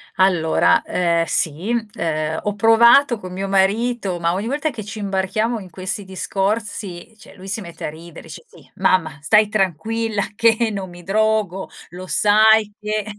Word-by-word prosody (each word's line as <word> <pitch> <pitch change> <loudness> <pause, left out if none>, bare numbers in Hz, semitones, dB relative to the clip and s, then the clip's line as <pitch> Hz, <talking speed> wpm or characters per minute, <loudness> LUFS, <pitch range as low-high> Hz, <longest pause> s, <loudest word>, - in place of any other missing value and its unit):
Allora, 180 -4 +3
ehm, 170 -2 0
sì, 165 +9 0 0.2
ehm, 155 -1 -2
ho 205 -1 -2
provato 235 +4 +5
con 185 -3 -9
mio 195 +2 -4
marito, 195 0 0
ma 170 0 0
ogni 200 +5 -3
volta 295 +4 -1
che 235 -6 -7
ci 210 +1 -8
imbarchiamo 205 +4 -1
in 190 -3 -11
questi 190 +3 -4
discorsi, 195 +1 -3
cioè 230 - -16
lui 190 0 -12
si 210 +3 -3
mette 170 -2 -8
a - - -2
ridere 165 +2 -12
dice: - - -10
"Sì, - - -19
mamma 160 -6 +1
stai 210 +7 +4
tranquilla 215 +2 -1
che 230 0 +3
non 195 -2 -5
mi 175 0 -13
drogo, 205 -1 0 0.2
lo 180 +1 -9
sai 215 +1 +4
che" 210 0 -3
200 Hz, 165 wpm, -20 LUFS, 180-220 Hz, 0.2 s, provato